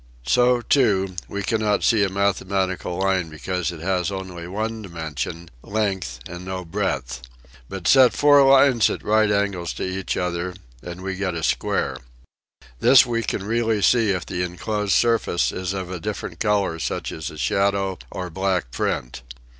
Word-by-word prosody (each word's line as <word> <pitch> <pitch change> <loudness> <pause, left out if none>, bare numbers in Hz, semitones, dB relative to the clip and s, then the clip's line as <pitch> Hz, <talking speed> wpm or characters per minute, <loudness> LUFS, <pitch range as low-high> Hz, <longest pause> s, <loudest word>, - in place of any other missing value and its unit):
So, 125 - +3
too, 100 -8 +2
we 100 0 -4
cannot 105 0 0
see 110 -3 +4
a 100 - +1
mathematical 95 -2 -1
line 95 -3 0
be 80 - -11
cause 90 +1 -2
it 85 -2 -9
has 95 +1 0
only 95 -3 -6
one 110 +4 -3
dimension, 85 -2 -6
length 95 - -2
and 90 +1 -8
no 95 0 -5
breadth. 70 -10 -3 0.5
But 95 -3 -5
set 130 -2 +6
four 145 -1 +6
lines 135 -3 +5
at - - -4
right 110 0 +3
angles 100 -4 0
to - - -4
one 95 +1 -4
another 90 0 -2 0.3
and 90 +1 -8
we. 95 0 -3
get 95 -2 -2
a 80 - -4
square. - - 0 0.8
This 130 - +7
we 115 -1 -1
can 105 -3 -3
really 110 -1 0
see 115 -3 +4
if 90 -2 -1
the 90 - -3
enclosed 100 +3 -2
surface 115 -7 +2
is 90 0 -3
of 95 -2 -4
a 90 - -4
different 105 +4 -5
color 100 -6 +1
such - - -3
as 80 0 -5
a 75 - -11
shadow 95 +7 0
or 90 -1 -6
black 95 -6 -1
print. 60 0 -3
95 Hz, 170 wpm, -23 LUFS, 90-105 Hz, 0.8 s, This